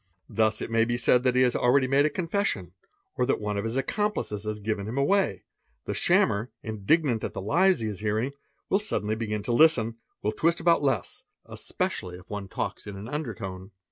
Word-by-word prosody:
Thus; 110 0 +1
may 115 0 +2
be 120 +1 0
said 125 0 +4
that 125 0 +1
he 130 - +5
has 125 -1 +2
already 130 +2 +3
made 140 +3 +4
a - - 0
confession, 165 - -1 0.5
or 125 - +1
that - - +1
one 105 -1 -2
of 100 - -1
his 115 +2 -3
scomplices 135 - -1
has 105 0 -3
given 105 -1 -2
him 115 +5 -4
away; 140 - +2 0.4
the - - -2
shammer, 110 +5 +2
indignant 115 +4 +1
at - - -3
the - - -4
lies 175 - +3
he 110 - -1
is 105 -2 -5
earing, 110 +6 0 0.3
will 195 - +2
suddenly 110 - -1
begin 105 -2 -3
to 120 - -2
listen, 115 -6 +4 0.3
will 105 - +1
twist 165 +6 +1
about 170 -2 +4
less, 135 -5 -1 0.2
especially 90 -1 -3
if 90 0 -16
me 100 -1 -4
talks 95 - -4
in 100 - -6
an 100 +3 -7
undertone. 100 -10 -5
115 Hz, 200 wpm, -27 LUFS, 105-140 Hz, 0.5 s, he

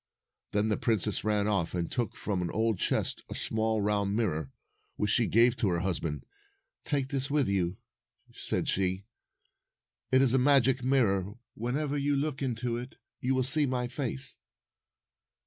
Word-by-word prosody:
Then 105 +1 +1
the 105 - +1
princess 110 -2 0
ran 105 -1 +1
off 95 -5 0
and 85 -2 -2
took 120 -3 -2
from 100 -4 -2
an 85 - -2
old 110 0 0
chest - - 0
a - - -5
small 110 -1 0
round 100 -1 +1
mirror, 80 - -1 0.4
which 105 -1 0
she 115 -1 +3
gave 120 +2 +4
to 105 - +1
her 85 -1 0
husband. 85 -6 -2 0.6
"Take 140 -2 0
this 135 -1 -1
with 145 -1 +2
you," 95 -2 0 0.6
said - - -2
she. 95 0 0 1.1
"It 130 +1 +5
is 130 -2 +3
a 130 - +4
magic 130 -1 +4
mirror. 105 -7 +2 0.2
Whenever 140 +5 -2
you 145 +1 +1
look 140 0 -2
into 120 -2 -2
it, 125 +2 -8 0.2
you 130 +1 0
will 130 - +2
see 140 +3 +2
my 125 -1 -1
face." 120 - +1
115 Hz, 165 wpm, -29 LUFS, 100-130 Hz, 1.1 s, It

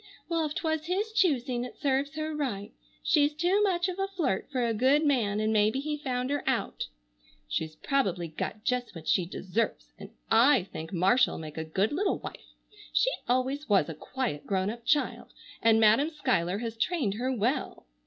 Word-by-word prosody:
Well, 330 -2 0
if 300 - -7
'twas 315 -3 -1
his 400 +5 -1
choosing 255 - +1
it 250 - -8
serves 280 +2 0
her 310 0 -3
right. 225 -9 -3 0.3
She's 295 -1 +3
too 355 +6 +2
much 360 -3 +2
of 370 0 -4
a 390 - +1
flirt 325 - -1
for 255 -3 0
a 230 - +1
good 265 +7 +3
man 225 -8 +2
and 215 +1 +1
maybe 215 +4 +3
he 300 +2 -2
found 260 -3 -2
her 290 -1 -1
out. - - -1 0.6
She's 155 - -3
probably 190 - 0
got 185 +6 -5
just 250 -4 -1
what 160 -1 -9
she 180 -3 +2
deserves, 195 +5 -3
and - - -9 0.2
I 230 -1 +6
think 160 -3 -8
Marcia'll 195 +8 +3
make 155 -1 -7
a - - -2
good 190 +7 0
little 380 +6 0
wife. - - -10 0.4
She - - +3 0.2
always 260 +3 0
was 195 -6 +4
a - - -4
quiet, 230 - -4
grown 190 0 0
up 235 0 -10
child 295 -1 0 0.3
and 225 -1 +5
Madam 225 +8 +5
Schuyler 190 - 0
has 230 0 -5
trained 250 - 0
her 250 +5 -2
well! 240 - -1
250 Hz, 185 wpm, -29 LUFS, 205-300 Hz, 0.6 s, I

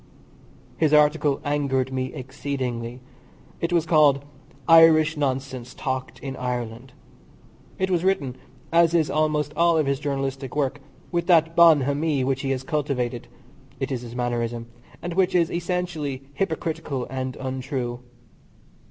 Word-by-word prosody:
His 155 -2 +2
article 150 -1 +4
angered 135 -3 0
me 130 0 -2
exceedingly. 130 -3 -4 0.6
It 170 - -1
was 170 -2 +2
called 145 -4 +4 0.4
"Irish 165 -1 +7
Nonsense 130 -3 -3
talked 130 -1 -4
in 135 -1 -5
Ireland." 125 0 -4 0.8
It 190 0 -1
was 175 -1 +1
written 145 -10 0 0.4
(as 170 0 +4
is 160 -3 +2
almost 150 -1 0
all 170 +1 +4
of 155 - +2
his 140 -1 0
journalistic 135 -2 -3
work) 145 -1 -1 0.3
with 170 -1 -1
that 165 -2 +4
bonhomie 150 -3 +4
which 135 +1 0
he 135 - -2
has 130 -1 -1
cultivated 130 -5 -2 0.5
it - - -3
is 125 -3 -2
his 120 -1 -9
mannerism 120 -1 -2 0.4
and 175 - -3
which 185 0 +2
is 170 -1 +3
essentially 170 -6 -3
hypocritical 160 -5 -2
and 130 0 -4
untrue. 130 -2 -4
140 Hz, 135 wpm, -24 LUFS, 130-160 Hz, 0.8 s, Irish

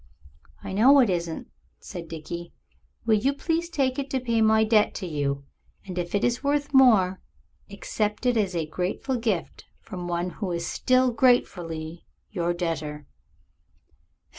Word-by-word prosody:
"I - - -5
know 260 +8 +6
it 240 -7 +4
isn't," 170 -2 -3 0.3
said 175 -3 -8
Dickie; 170 +2 -7 0.5
"will 220 -2 +4
you 270 +6 +1
please 330 +3 -1
take 270 -5 0
it 275 0 -4
to 265 - 0
pay 235 -3 0
my 220 0 +5
debt 215 -1 +3
to - - -4
you, 140 -4 -2 0.4
and 185 -2 -7
if 175 +2 -3
it 200 - +1
is 245 +2 0
worth 290 +1 0
more, 215 -9 +5 0.5
accept 210 +3 -3
it 245 -1 +3
as 200 -5 0
a 165 -2 0
grateful 185 - -2
gift 220 -8 -2
from 180 -4 -7
one 175 +1 -2
who 195 -2 -4
is 170 0 -2
still 255 0 +2
gratefully 175 -9 0 0.2
your 175 -4 -1
debtor." 155 -4 -3
200 Hz, 155 wpm, -26 LUFS, 170-250 Hz, 0.5 s, know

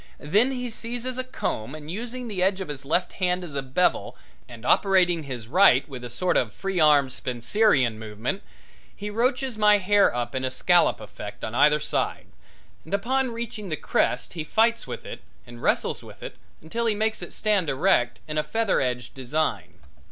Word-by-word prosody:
Then 210 - +2
he 250 -1 -3
seizes 245 +3 -4
a - - -1
comb, 135 - -4
and 155 0 -8
using 240 +5 -5
the 200 -5 -3
edge 190 +1 +2
of 190 -5 -5
his 135 -2 -7
left 170 +5 0
hand 180 0 +1
as 165 -5 -8
a 140 - -1
bevel 135 +7 0 0.3
and 120 -1 -11
operating 180 -2 +3
his 125 -6 -6
right 145 - +5
with 130 -4 -8
a 120 - -6
sort 180 +10 0
of 110 -4 0
free 195 -2 -3
arm 145 -4 +5
Spencerian 125 - +1
movement, 110 - -4 0.5
he 210 0 -6
roaches 250 +1 0
my 210 -1 +6
hair 205 +1 +3
up 120 -1 -2
in 130 - -2
a 130 - 0
scallop 175 +7 +3
effect 105 -1 -9
on 110 - -4
either 150 +4 +4
side, - - -2 0.6
and 160 - -2
upon 260 +6 0
reaching 230 -3 -6
the 155 - -1
crest 125 - 0
he 165 -3 -4
fights 230 +8 +1
with - - -7
it - - -8 0.2
and 120 0 -12
wrestles - - 0
with - - -13
it - - -7 0.3
until 230 +9 -2
he 215 - +2
makes 220 +1 -1
it - - -7
stand 205 -7 +1
erect 135 -4 +2
in 155 0 -1
a - - 0
feather 225 +7 0
edged 125 -1 -2
design. 140 +4 -2
180 Hz, 190 wpm, -25 LUFS, 130-215 Hz, 0.6 s, my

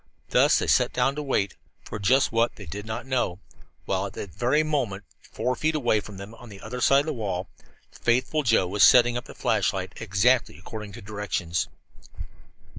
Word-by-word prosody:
Thus - - +4
they - - 0
sat - - +3
down 125 +2 +2
to 150 - -3
wait 120 -9 0 0.3
for 105 - -7
just 130 +7 +3
what, 115 +1 +1
they 100 - -10
did 100 +6 -7
not 110 +3 -4
know 125 -9 -1 0.5
while 95 +1 -1
at 95 - -11
that 100 -6 -7
very 140 +6 +2
moment, 125 -11 -2 0.2
four 125 0 -3
feet 155 +3 0
away 120 -7 +2
from 100 -1 -10
them 100 +3 -9
on 120 +1 -13
the 100 -2 -11
other 125 +5 -6
side 135 +3 +5
of - - -7
the 160 - -2
wall, 95 -6 -3 0.4
faithful 130 +6 0
Joe 115 -8 +3
was 100 +3 -2
setting 120 -1 +7
up 120 - -4
the - - -12
flashlight - - 0
exactly 115 +6 +2
according 105 +2 -8
to - - -10
directions. 100 -5 -2
115 Hz, 190 wpm, -25 LUFS, 100-125 Hz, 0.5 s, setting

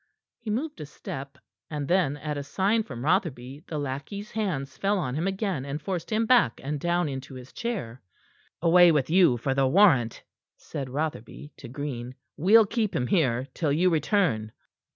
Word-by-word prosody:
He 230 - -7
moved 290 +8 -3
a 150 - -6
step, 140 -1 -8 0.3
and 150 -3 -4
then, 175 -5 +2
at 150 +1 -4
a 145 - -3
sign 195 +10 +1
from 130 - -7
Rotherby, 150 -5 -1
the 155 - -4
lackey's 145 +9 -5
hands 180 -11 -3
fell 200 +1 0
on 130 -9 -2
him 160 +6 -1
again, 190 - -2
and 140 +2 -4
forced 175 +3 -4
him 220 +1 +2
back 230 - +4
and 145 +2 -3
down 175 +1 0
into 135 -1 -6
his 130 0 -11
chair. 180 - -4 0.6
"Away 175 0 +7
with 150 -2 +1
you 175 -9 +5
for 135 +3 -1
the 135 0 +2
warrant," 135 - +4 0.3
said 135 -3 -6
Rotherby 145 0 -5
to 130 - -10
Green. 130 -1 -5 0.2
"We'll 210 +7 +6
keep 220 0 -1
him 125 - 0
here 130 -6 +1
till 155 -5 -1
you 175 +5 +3
return." 150 - +1
150 Hz, 175 wpm, -26 LUFS, 135-190 Hz, 0.6 s, Away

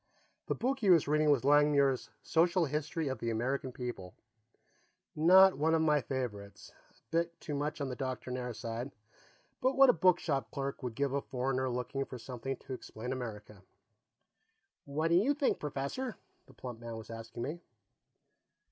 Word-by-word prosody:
The - - 0
book 265 +2 -1
he 205 - +1
was 170 -5 +6
reading 150 +1 +3
was 140 -4 +3
Langmuir's 145 -2 +4
Social 170 +1 +3
History 150 +2 -2
of 130 -3 -3
the 115 - -2
American 130 +4 -1
People 120 -8 -6 1.0
not 185 +2 +7
one 160 +2 +3
of 160 - +2
my 150 -2 +3
favorites, 110 -7 -5 0.2
a - - -30 0.2
bit 170 +1 0
too 150 - -5
much 145 +2 -2
on 140 - -2
the 125 - -4
doctrinaire 125 -1 -4
side, 115 +3 -5 0.7
but 260 +1 +1
what 270 -2 +8
a - - -5
bookshop 160 -8 +2
clerk 140 +4 -4
would 125 -3 -4
give 140 +1 0
a 140 - 0
foreigner 130 0 -1
looking 125 +2 -2
for 130 - -8
something 125 +2 -5
to 135 - -8
explain 125 0 -6
America. 105 -5 -7 1.2
"What 155 +3 -1
do 170 - +4
you 260 +10 +3
think, 285 -2 +1
Professor?" 150 - -3 0.3
the - - -17
plump 120 -3 -7
man 115 -1 -6
was 110 0 -9
asking 115 +1 -7
me. 150 +7 -4
135 Hz, 165 wpm, -32 LUFS, 125-160 Hz, 1.2 s, what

